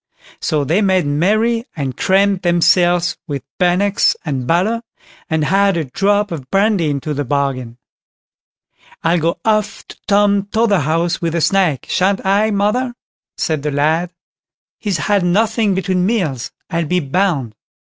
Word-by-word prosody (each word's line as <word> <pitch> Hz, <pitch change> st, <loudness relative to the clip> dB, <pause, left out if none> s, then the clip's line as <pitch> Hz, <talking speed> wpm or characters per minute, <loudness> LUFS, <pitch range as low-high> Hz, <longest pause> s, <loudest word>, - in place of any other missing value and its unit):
So 155 Hz, -4 st, 0 dB
they 165 Hz, +9 st, +1 dB
made 190 Hz, -4 st, +2 dB
merry, 215 Hz, +11 st, +1 dB
and 135 Hz, -5 st, -3 dB
crammed 195 Hz, +2 st, +2 dB
themselves 175 Hz, 0 st, +2 dB
with 140 Hz, -3 st, -4 dB, 0.2 s
bannocks 185 Hz, +3 st, +2 dB
and 135 Hz, -5 st, -3 dB
butter, 200 Hz, +9 st, +1 dB, 0.5 s
and 160 Hz, -2 st, 0 dB
had 195 Hz, 0 st, +2 dB
a 165 Hz, -, 0 dB
drop 205 Hz, +8 st, 0 dB
of 140 Hz, -6 st, -6 dB
brandy 195 Hz, -5 st, +2 dB
into 145 Hz, +1 st, -3 dB
the 145 Hz, 0 st, -2 dB
bargain. 130 Hz, -3 st, -2 dB, 1.3 s
"I'll 170 Hz, +1 st, +2 dB
go 165 Hz, +2 st, -1 dB
off 215 Hz, -1 st, 0 dB
to -, -, -11 dB
Tom 200 Hz, -1 st, +2 dB
Totherhouse 175 Hz, -7 st, +1 dB
with 165 Hz, -1 st, -1 dB
a 170 Hz, -, 0 dB
snack—shan't 190 Hz, +2 st, +1 dB
I, 200 Hz, +3 st, +2 dB
mother?" 220 Hz, +5 st, 0 dB, 0.4 s
said 155 Hz, -3 st, -1 dB
the 150 Hz, -, -2 dB
lad. 155 Hz, +5 st, 0 dB, 0.7 s
"He's 200 Hz, -5 st, -1 dB
had 195 Hz, +5 st, +1 dB
nothing 210 Hz, +2 st, +1 dB
between 185 Hz, -1 st, 0 dB
meals, 165 Hz, -, -1 dB, 0.2 s
I'll 165 Hz, 0 st, 0 dB
be 180 Hz, +4 st, +1 dB
bound." 145 Hz, -, -1 dB
180 Hz, 140 wpm, -17 LUFS, 155-200 Hz, 1.3 s, made